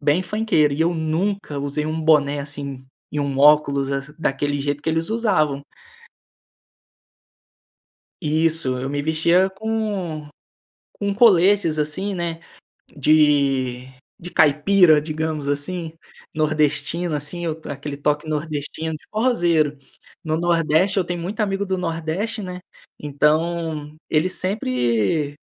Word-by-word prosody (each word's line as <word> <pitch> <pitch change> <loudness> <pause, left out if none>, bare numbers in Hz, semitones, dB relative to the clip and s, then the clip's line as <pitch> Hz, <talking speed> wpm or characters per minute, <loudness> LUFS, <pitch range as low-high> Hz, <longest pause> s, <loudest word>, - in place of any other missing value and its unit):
Bem 150 +5 +2
funkeiro 185 -7 +1
e 150 - -3
eu 170 +1 +2
nunca 160 0 -2
usei 145 +2 -2
um 155 +1 -2
boné 150 -2 +3
assim, 140 -2 -6 0.2
e 150 - -3
um 140 -1 -2
óculos 140 -1 +4
assim, 140 +2 -4
daquele 145 -2 -1
jeito 145 +1 -2
que - - -4
eles 160 +4 -1
usavam. 170 -12 +1 2.6
Isso, 155 -3 +1
eu 130 +2 -4
me 145 0 -2
vestia 170 +5 +2
com 195 -7 -3 0.7
com 200 0 -1
coletes, 195 -6 +4
assim, 185 +7 -2
né, 170 -2 -3 0.6
de 140 -4 +2 0.3
de 175 - -9
caipira, 155 +2 +5
digamos 155 -1 -3
assim, 160 +3 -2 0.4
nordestino 155 +2 0
assim, 150 +4 -4 0.3
aquele 140 0 -6
toque 150 +1 -1
nordestino 155 +1 -3
de 155 - -9
forrozeiro. 170 - +1 0.5
No 155 0 -1
nordeste 170 +3 +2
eu 190 - +3
tenho 175 -1 -4
muito 195 +6 -5
amigo 200 -1 -1
do 190 -1 -1
nordeste, 180 +6 -3
né, 180 -1 -6 0.4
então, 155 +1 0
ele 155 +3 +2
sempre 140 - 0
155 Hz, 120 wpm, -21 LUFS, 145-175 Hz, 2.6 s, caipira